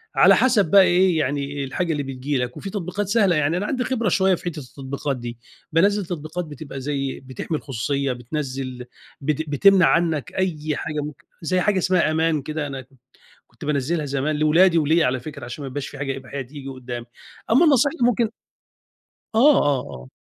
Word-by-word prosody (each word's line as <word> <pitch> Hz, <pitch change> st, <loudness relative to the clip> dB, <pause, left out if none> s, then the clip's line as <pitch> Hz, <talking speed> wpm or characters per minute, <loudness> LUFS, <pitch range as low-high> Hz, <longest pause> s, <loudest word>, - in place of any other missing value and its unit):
على -, -, +7 dB
حَسَب 220 Hz, -10 st, +3 dB
بقى 200 Hz, -1 st, +8 dB
إيه، 180 Hz, -1 st, +3 dB
يعني 140 Hz, 0 st, -2 dB
الحاجة 165 Hz, +6 st, -2 dB
اللي 145 Hz, -2 st, -1 dB
بتيجي 135 Hz, +1 st, -3 dB
لك. 125 Hz, 0 st, -3 dB
وفي 195 Hz, -, -6 dB
تطبيقات 195 Hz, 0 st, -3 dB
سهلة، 200 Hz, -5 st, +3 dB
يعني 150 Hz, +3 st, +1 dB
أنا 200 Hz, -, -2 dB
عندي 255 Hz, 0 st, -1 dB
خبرة 235 Hz, -6 st, 0 dB
شوية 190 Hz, -1 st, +3 dB
في -, -, -13 dB
حتّة 165 Hz, -3 st, -3 dB
التطبيقات 135 Hz, +1 st, -5 dB
دي، 120 Hz, -1 st, -7 dB, 0.3 s
بانزّل 200 Hz, +4 st, +3 dB
تطبيقات 165 Hz, +1 st, -5 dB
بتبقى 145 Hz, -2 st, -8 dB
زي 135 Hz, -1 st, -3 dB
بتحمي 135 Hz, +4 st, -4 dB
الخصوصية، 140 Hz, +1 st, -2 dB
بتنزّل 130 Hz, -1 st, -5 dB, 0.4 s
بت 155 Hz, +2 st, -2 dB
بتمنع 190 Hz, +5 st, +5 dB
عنّك 165 Hz, -4 st, +1 dB
أي 155 Hz, -5 st, -1 dB
حاجة 150 Hz, -2 st, -3 dB
ممكن 150 Hz, -1 st, -8 dB, 0.2 s
زي 185 Hz, +2 st, 0 dB
حاجة 200 Hz, +1 st, +2 dB
اسمها 180 Hz, -3 st, +2 dB
أمان 160 Hz, -2 st, +1 dB
كده 155 Hz, +1 st, -4 dB
أنا 135 Hz, -1 st, -6 dB
كنت 130 Hz, 0 st, -22 dB, 0.5 s
كنت 120 Hz, +3 st, -12 dB
بانزّلها 150 Hz, +2 st, 0 dB
زمان 140 Hz, +2 st, -1 dB
لأولادي 165 Hz, +4 st, +4 dB
وليّا 160 Hz, +2 st, +3 dB
على 125 Hz, 0 st, 0 dB
فكرة 140 Hz, -2 st, -8 dB
عشان 120 Hz, +5 st, -7 dB
ما -, -, -5 dB
يبقاش 140 Hz, +1 st, -4 dB
في 145 Hz, -, -10 dB
حاجة 135 Hz, -1 st, -3 dB
إباحية 135 Hz, +1 st, -6 dB
تيجي 135 Hz, +1 st, -9 dB
قدّامي. 125 Hz, -2 st, -7 dB, 0.5 s
أمّا 270 Hz, +9 st, +6 dB
النصيحة 285 Hz, 0 st, +4 dB
اللي 245 Hz, -4 st, +3 dB
ممكن 230 Hz, -1 st, +1 dB, 1.1 s
آه، 280 Hz, +5 st, +6 dB
آه، 145 Hz, -3 st, +2 dB
آه. 65 Hz, 0 st, -10 dB
150 Hz, 185 wpm, -22 LUFS, 135-180 Hz, 1.1 s, بقى